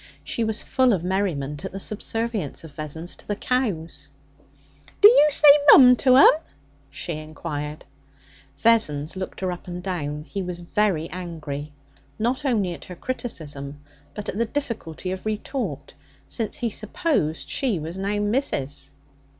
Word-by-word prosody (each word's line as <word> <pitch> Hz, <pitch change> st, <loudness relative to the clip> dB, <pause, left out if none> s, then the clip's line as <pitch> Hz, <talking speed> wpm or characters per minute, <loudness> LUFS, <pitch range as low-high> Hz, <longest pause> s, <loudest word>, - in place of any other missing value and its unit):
She 230 Hz, -, -2 dB
was 220 Hz, -1 st, -1 dB
full 260 Hz, -3 st, +3 dB
of 175 Hz, -4 st, -1 dB
merriment 165 Hz, -7 st, -2 dB
at -, -, -5 dB
the 195 Hz, -, -6 dB
subservience 220 Hz, -, -3 dB
of 160 Hz, -3 st, -11 dB
Vessons 155 Hz, +3 st, -5 dB
to -, -, -15 dB
the 205 Hz, -, -1 dB
cows. 170 Hz, -, -2 dB, 0.9 s
'D'you 410 Hz, -7 st, +8 dB
say 300 Hz, +1 st, +6 dB, 0.2 s
"mum" 250 Hz, -3 st, +9 dB
to 255 Hz, 0 st, +5 dB
'em?' 275 Hz, -, +9 dB, 0.6 s
she 170 Hz, +5 st, -5 dB
inquired. 155 Hz, -1 st, -6 dB, 0.7 s
Vessons 155 Hz, -7 st, +2 dB
looked 185 Hz, 0 st, -6 dB
her 185 Hz, -1 st, -1 dB
up 175 Hz, +1 st, -8 dB
and 180 Hz, 0 st, -6 dB
down. 150 Hz, -6 st, -3 dB
He 195 Hz, +5 st, -5 dB
was 180 Hz, -1 st, -5 dB
very 175 Hz, -2 st, 0 dB
angry, 155 Hz, -5 st, -6 dB, 0.5 s
not 245 Hz, +5 st, -1 dB
only 210 Hz, -9 st, +1 dB
at -, -, -11 dB
her 180 Hz, -, -9 dB
criticism, 150 Hz, -, -6 dB, 0.4 s
but 210 Hz, -, -6 dB
at 205 Hz, -, -3 dB
the 235 Hz, -, +2 dB
difficulty 220 Hz, -, -4 dB
of 190 Hz, +3 st, -5 dB
retort, 235 Hz, +5 st, -4 dB, 0.3 s
since 225 Hz, -4 st, -2 dB
he 235 Hz, -2 st, -2 dB
supposed 215 Hz, -, -1 dB
she 250 Hz, -8 st, 0 dB
was 160 Hz, +2 st, -6 dB
now 200 Hz, +2 st, -2 dB
'missus.' 205 Hz, -, -1 dB
185 Hz, 150 wpm, -24 LUFS, 155-230 Hz, 0.9 s, mum